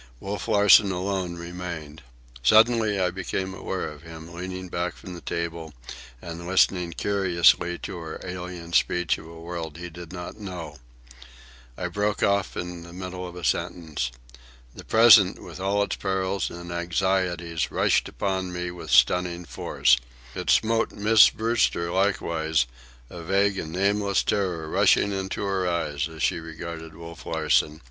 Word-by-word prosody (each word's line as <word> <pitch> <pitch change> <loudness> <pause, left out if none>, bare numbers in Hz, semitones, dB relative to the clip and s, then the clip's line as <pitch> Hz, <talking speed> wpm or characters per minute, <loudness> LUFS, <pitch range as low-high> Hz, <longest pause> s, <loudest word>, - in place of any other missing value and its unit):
Wolf 100 +3 -5
Larsen 105 -2 +6
alone 90 -1 -2
remained. 85 -3 -7 0.4
Suddenly 110 - +4
I 90 -1 +1
became 95 +1 -3
aware 95 0 -4
of 75 -1 -10
him, 80 0 -11
leaning 90 +1 -6
back 90 0 -3
from 90 - -10
the 85 - -9
table 85 -3 -4 0.5
and 85 0 -7
listening 90 -2 +2
curiously 90 -3 +2
to 85 - -7
our 80 -1 -7
alien 90 -2 -7
speech 90 0 +2
of - - -12
a 85 0 -11
world 85 -2 -6
he 85 0 -7
did 85 0 -10
not 90 +3 -7
know. 90 -7 -7 1.0
I 90 - -2
broke 105 +4 -1
short - - +4
off 100 -1 -1
in 90 -1 -5
the 85 0 -11
middle 90 0 -6
of 90 - -10
a 90 - -8
sentence. 80 -10 -1 0.6
The - - -11
present, 110 -4 +6
with 90 0 -10
all 100 +2 +1
its - - -3
perils 95 -1 -1
and 85 0 -8
anxieties, 85 -1 -1
rushed - - +2
upon 95 -2 -2
me 90 0 -4
with 90 - -9
stunning 85 +8 +3
force. 75 - +2 0.4
It - - -4
smote 115 +1 +3
Miss 105 +1 +6
Brewster 110 -7 0
likewise, 85 -7 +1 0.5
a 85 - -8
vague 100 +3 +1
and 80 - -5
nameless 100 +2 +1
terror 90 -6 -1
rushing 100 - +3
into 95 0 -3
her 95 -2 0
eyes 80 -3 -1
as 80 -1 -6
she - - +1
regarded 80 0 -8
Wolf 85 0 -10
Larsen. 75 -1 +1
90 Hz, 155 wpm, -25 LUFS, 85-95 Hz, 1.0 s, Larsen